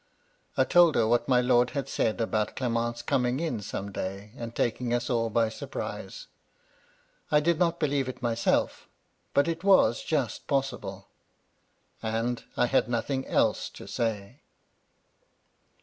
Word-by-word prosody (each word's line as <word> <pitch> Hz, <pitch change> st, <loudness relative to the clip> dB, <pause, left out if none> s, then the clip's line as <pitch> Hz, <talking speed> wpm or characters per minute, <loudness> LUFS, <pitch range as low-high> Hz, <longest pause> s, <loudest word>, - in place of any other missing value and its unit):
" -, -, -36 dB
I -, -, +5 dB
told 175 Hz, -3 st, +5 dB
her 115 Hz, -, +3 dB
what 120 Hz, +1 st, +2 dB
my 125 Hz, -2 st, +4 dB
lord 125 Hz, 0 st, +3 dB
had 140 Hz, -, -2 dB
said 110 Hz, -, 0 dB
about 110 Hz, -1 st, -1 dB
Clement's 120 Hz, -2 st, -1 dB
coming 125 Hz, -2 st, +1 dB
in 155 Hz, -10 st, -2 dB
some 100 Hz, 0 st, -5 dB
day, 100 Hz, +2 st, -5 dB
and 115 Hz, -3 st, -7 dB
taking 120 Hz, +1 st, 0 dB
us 120 Hz, +1 st, -2 dB
all 115 Hz, -1 st, +1 dB
by 115 Hz, +1 st, +2 dB
surprise. -, -, -6 dB, 1.0 s
I 150 Hz, -, +5 dB
did 170 Hz, +2 st, +1 dB
not 170 Hz, -1 st, +1 dB
believe 140 Hz, -4 st, 0 dB
it 130 Hz, -, -7 dB
myself, 115 Hz, -2 st, 0 dB, 0.5 s
but 140 Hz, +2 st, +4 dB
it 165 Hz, +1 st, -2 dB
was 190 Hz, -, +5 dB
just 140 Hz, -9 st, -2 dB
possible, 135 Hz, -2 st, -2 dB, 0.5 s
— -, -, -43 dB, 0.2 s
and 115 Hz, +2 st, -2 dB
I -, -, +4 dB
had 120 Hz, -2 st, +2 dB
nothing 130 Hz, +3 st, -1 dB
else -, -, +1 dB
to -, -, -11 dB
say. 110 Hz, +2 st, -3 dB
120 Hz, 150 wpm, -28 LUFS, 115-140 Hz, 1.0 s, I